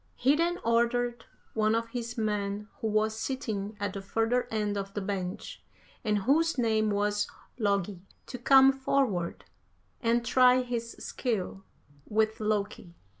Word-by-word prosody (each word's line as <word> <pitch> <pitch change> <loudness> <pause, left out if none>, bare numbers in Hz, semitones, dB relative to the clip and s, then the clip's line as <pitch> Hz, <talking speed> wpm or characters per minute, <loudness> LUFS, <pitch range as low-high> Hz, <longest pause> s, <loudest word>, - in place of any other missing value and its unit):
"He 270 +4 +3
then 340 +3 +1
ordered 235 +1 +1 0.3
one 215 0 +2
of 230 0 -1
his 235 0 -5
men, 210 -1 -2
who 225 - -1
was 215 0 +1
sitting 215 -6 -3
at 200 -1 -2
the 195 - -5
further 225 +5 0
end 210 -2 -1
of 195 0 -5
the - - 0
bench, 190 - -4 0.4
and 210 -2 +1
whose 320 +6 +2
name 220 -3 +2
was 205 0 0 0.3
Logi, 200 -3 0 0.2
to 250 - -7
come 270 +2 +7
forward 265 -10 -1 0.6
and 235 0 +1
try 255 +1 +5
his 235 -2 -4
skill 200 -5 -3 0.4
with 220 0 +1
Loki. 205 -4 -2
220 Hz, 140 wpm, -29 LUFS, 205-245 Hz, 0.6 s, come